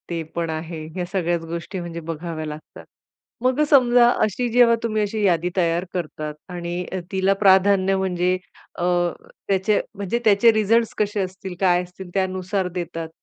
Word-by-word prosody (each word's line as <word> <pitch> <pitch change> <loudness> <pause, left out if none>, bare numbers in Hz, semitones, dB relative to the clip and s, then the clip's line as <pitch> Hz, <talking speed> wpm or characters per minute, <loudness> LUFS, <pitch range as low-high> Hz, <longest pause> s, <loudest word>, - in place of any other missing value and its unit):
ते 170 -1 -2
पण 170 -1 -1
आहे, 160 0 -5
ह्या 180 -1 -2
सगळ्याच 175 -3 0
गोष्टी 170 +3 -5
म्हणजे 170 -1 -6
बघाव्या 165 0 -5
लागतात. 150 0 -9 0.6
मग 255 +2 +2
समजा 245 -4 +6 0.2
अशी 215 +4 0
जेव्हा 235 0 +5
तुम्ही 215 -2 0
अशी 210 +1 -1
यादी 175 -2 +2
तयार 170 0 +1
करता 155 -3 -4 0.2
आणि 175 0 -4 0.3
तिला 190 0 +2
प्राधान्य 195 -1 +4
म्हणजे 180 -1 0 0.4
अ, - - -1 0.6
त्याचे 195 +1 +2 0.2
म्हणजे 200 +3 -2
त्याचे 215 +2 +6
रिझल्ट्स 220 +2 +2
कसे 210 0 0
असतील, 190 0 -6
काय 180 -2 +3
असतील 180 +1 -11
त्यानुसार 190 0 -1
देतात. 165 -2 -4
185 Hz, 150 wpm, -22 LUFS, 170-205 Hz, 0.6 s, समजा